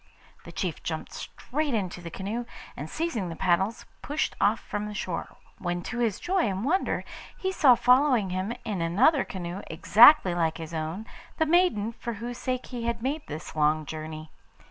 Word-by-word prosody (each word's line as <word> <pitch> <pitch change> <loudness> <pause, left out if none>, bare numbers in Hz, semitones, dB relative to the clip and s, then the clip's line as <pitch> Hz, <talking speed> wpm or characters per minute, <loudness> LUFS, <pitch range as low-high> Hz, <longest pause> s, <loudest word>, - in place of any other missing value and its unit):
The - - -9
chief - - -3
jumped - - -5
straight 290 -1 -3
into 185 -4 -3
the 170 - -7
canoe, 210 +7 -4 0.3
and - - -6
seizing 275 - -2
the 165 - -5
paddles 190 +6 +1 0.2
pushed 295 +2 -2
off 220 +2 +3
from 210 0 -4
the 210 - -7
shore, - - -4 0.2
when 175 -1 -2
to 240 - -4
his 225 -5 0
joy 370 -4 +1
and 195 +3 -3
wonder 365 +7 +1 0.3
he 380 - -1
saw 270 -9 +6
following 250 -6 +4
him 185 +4 -2
in 205 -6 -2
another 235 - +4
canoe 180 +1 -6
exactly 220 - +7
like 165 -2 0
his 165 0 -8
own 160 +6 -3 0.3
the 320 - +3
maiden 310 - +3
for 235 0 -5
whose 235 +3 -6
sake 255 -1 -2
he 235 -1 -3
had 235 -1 -2
made 290 +4 -1
this 155 +1 -7
long 155 0 +2
journey. 155 0 -7
210 Hz, 180 wpm, -27 LUFS, 175-255 Hz, 0.3 s, exactly